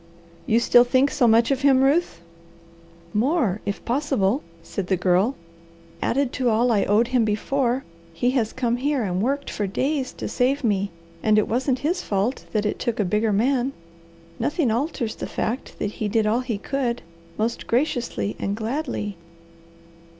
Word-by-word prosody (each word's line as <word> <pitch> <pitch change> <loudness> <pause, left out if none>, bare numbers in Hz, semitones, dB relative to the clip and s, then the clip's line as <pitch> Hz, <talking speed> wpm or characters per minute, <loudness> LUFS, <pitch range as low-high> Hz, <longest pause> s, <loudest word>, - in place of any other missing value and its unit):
"You 225 - +4
still 240 +1 +6
think 260 +3 +2
so 245 - +3
much 230 +3 +4
of 270 0 0
him, 270 -1 +5
Ruth?" 285 - +1 0.9
"More, 230 - +1
if 200 - -3
possible," 260 -3 +1 0.2
said 190 +1 -4
the 190 - +1
Girl. 185 +8 +2 0.7
"Added 270 0 0
to 250 -2 +1
all 235 +2 +3
I 205 -3 +2
owed 220 +4 +3
him 250 -2 +3
before, 245 +4 0 0.3
he 240 +10 0
has 235 -5 0
come 245 -2 0
here 275 0 0
and 185 -2 -1
worked 280 +5 -1
for 205 - -2
days 265 +6 -1
to - - -5
save 265 +3 +1
me, 200 -3 +1 0.3
and 215 -1 +3
it 215 - +3
wasn't 255 +3 0
his 350 +4 +1
fault 205 +6 -1
that 215 -1 0
it 210 - -1
took 235 -2 -2
a 205 - +2
bigger 210 +4 +1
man. 250 +5 +1 0.7
Nothing 280 +1 +1
alters 235 -2 -1
the - - -6
fact 240 +5 -3
that 205 - -2
he 215 - -3
did 220 +1 +1
all 220 +3 +2
he 250 -4 -3
could, 245 +1 -2 0.3
most 225 +2 -2
graciously 235 - 0
and 200 - -1
gladly." 225 - -3
235 Hz, 170 wpm, -23 LUFS, 210-265 Hz, 0.9 s, still